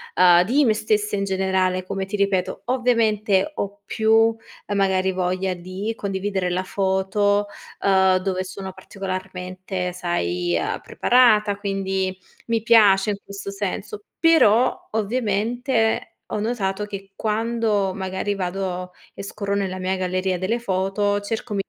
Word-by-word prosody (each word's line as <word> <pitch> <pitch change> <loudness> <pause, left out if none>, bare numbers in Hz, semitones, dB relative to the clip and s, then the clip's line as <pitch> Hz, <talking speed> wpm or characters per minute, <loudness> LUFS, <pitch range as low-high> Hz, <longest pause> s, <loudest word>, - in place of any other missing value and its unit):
uhm, 175 -1 +6
di 270 +8 +3
me 220 - +4
stessa 210 -1 0
in 200 - -1
generale, 190 -1 0
come 195 0 -3
ti 205 +2 -4
ripeto. 200 -2 0
Ovviamente 225 -5 +2
ho 200 0 -4
più, 225 +2 +3 0.3
ehm, 205 - -3
magari 190 -1 +2
voglia 185 +1 -1
di 185 +5 -5
condividere 195 -2 -2
la 180 +1 -1
foto, 200 +2 +1 0.3
uhm, 190 -1 +4
dove 185 0 -2
sono 190 0 -7
particolarmente, 185 -1 -5
sai, 90 - -1
uhm, - - -2
preparata, 215 -5 +3
quindi 195 -2 -2 0.3
mi 230 -2 +1
piace 210 -3 +5
in - - -1
questo 200 0 -7
senso. 200 - -4 0.2
Però, 255 -8 +4
ovviamente, 225 +2 0
ho - - -2
notato 210 -3 -1
che 195 -1 -8
quando 220 -3 0
magari 190 +1 -2
vado 185 -1 -3 0.2
e - - -8
scorro 200 0 -4
nella 195 -2 -1
mia 185 +1 -1
galleria 185 0 -1
delle 200 +6 0
foto, 205 -1 0
cerco 220 +1 -4
195 Hz, 135 wpm, -22 LUFS, 185-215 Hz, 0.3 s, uhm